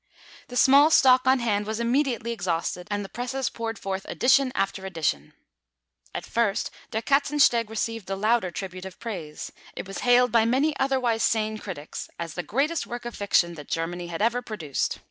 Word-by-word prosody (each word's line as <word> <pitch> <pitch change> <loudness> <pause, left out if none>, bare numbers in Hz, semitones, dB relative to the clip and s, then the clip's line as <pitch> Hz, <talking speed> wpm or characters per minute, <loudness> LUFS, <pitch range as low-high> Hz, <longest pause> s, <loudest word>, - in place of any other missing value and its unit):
The 245 - -9
small 280 +4 +7
stock 255 -4 +5
on 260 +1 +6
hand 210 -4 0
was 220 +1 -3
immediately 240 -1 0
exhausted, 180 -3 -2
and 205 -1 -2
the - - -10
presses 255 +2 -2
poured 225 -1 -4
forth 195 -1 -4
edition 265 +1 +3
after 195 0 -1
edition. 160 - -2 0.8
At - - -4
first 225 -4 0 0.2
Der 220 -1 -2
Katzensteg 275 -4 +3
received 225 -1 -3
the 195 - -2
louder 215 -1 +2
tribute 185 0 -6
of 190 -1 -10
praise; 175 -10 -6 0.2
it - - -6
was 195 - -6
hailed 245 0 +4
by 230 -1 +4
many 270 +6 +2
otherwise 255 -4 +1
sane 215 -1 +1
critics 165 -8 -7
as 170 -1 -5
the 175 - -3
greatest 275 - -1
work 240 0 -6
of 240 - -5
fiction 180 -4 +2
that 150 -4 -10
Germany 175 +2 -3
had 170 +3 -3
ever 235 +2 +2
produced. 170 - -3
225 Hz, 180 wpm, -26 LUFS, 190-245 Hz, 0.8 s, small